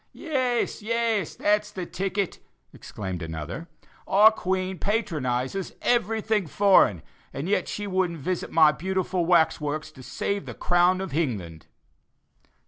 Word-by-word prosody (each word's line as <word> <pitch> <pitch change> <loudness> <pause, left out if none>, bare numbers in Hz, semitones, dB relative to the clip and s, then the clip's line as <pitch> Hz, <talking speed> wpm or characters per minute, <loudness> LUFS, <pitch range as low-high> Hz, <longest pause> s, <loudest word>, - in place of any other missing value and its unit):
"Yes, 255 -10 -1
yes, 225 -4 -1
that's 210 0 +1
the 190 -4 -6
ticket," 195 +1 -3 0.3
exclaimed 95 -4 -6
another; 80 - -6 0.4
"our 210 +3 +7
Queen 185 -2 -2
patronizes 160 - -1
everything 220 -4 +1
foreign, 150 - +4 0.3
and 140 +5 -5
yet 195 -2 +1
she 205 - -4
wouldn't 185 -3 0
visit 175 +4 -3
my 155 -2 +6
beautiful 185 +1 -2
wax 160 -3 +3
works 150 +1 -3
to 130 - -14
save 200 +9 -3
the - - -7
crown 175 +1 +2
of 190 - -5
Hingland." 105 - -3
185 Hz, 130 wpm, -25 LUFS, 150-205 Hz, 0.4 s, our